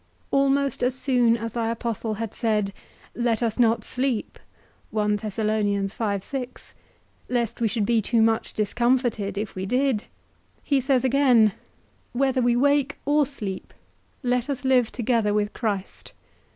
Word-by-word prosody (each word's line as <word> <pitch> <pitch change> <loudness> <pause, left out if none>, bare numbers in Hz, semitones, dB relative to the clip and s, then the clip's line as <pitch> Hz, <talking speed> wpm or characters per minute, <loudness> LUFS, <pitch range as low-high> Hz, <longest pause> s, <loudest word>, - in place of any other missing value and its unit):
Almost 275 0 +2
as 250 +1 +1
soon 245 -3 +2
as 230 0 -5
thy 230 -1 -1
apostle 230 -1 -3
had 225 0 -5
said, 210 -4 0 0.4
Let 240 -1 0
us 225 +1 -1
not 230 -2 +3
sleep, 255 -2 -2 0.5
lest 210 0 0 2.3
we 230 - +3
should 215 0 -1
be 230 0 +2
too 230 +2 +1
much 225 0 +1
discomforted 230 -2 0
if 210 0 -3
we 190 0 -4
did, 255 -2 +1 0.6
he 280 -2 +2
says 260 -1 +2
again, 255 -5 +4 0.6
Whether 260 0 +1
we 240 0 +3
wake 285 +2 +2
or 290 0 +3
sleep, 205 -9 -6 0.5
let 250 +1 0
us 275 -1 -3
live 250 -3 +3
together 230 -3 +1
with 205 0 0
Christ. 205 -5 -4
235 Hz, 130 wpm, -24 LUFS, 215-260 Hz, 2.3 s, again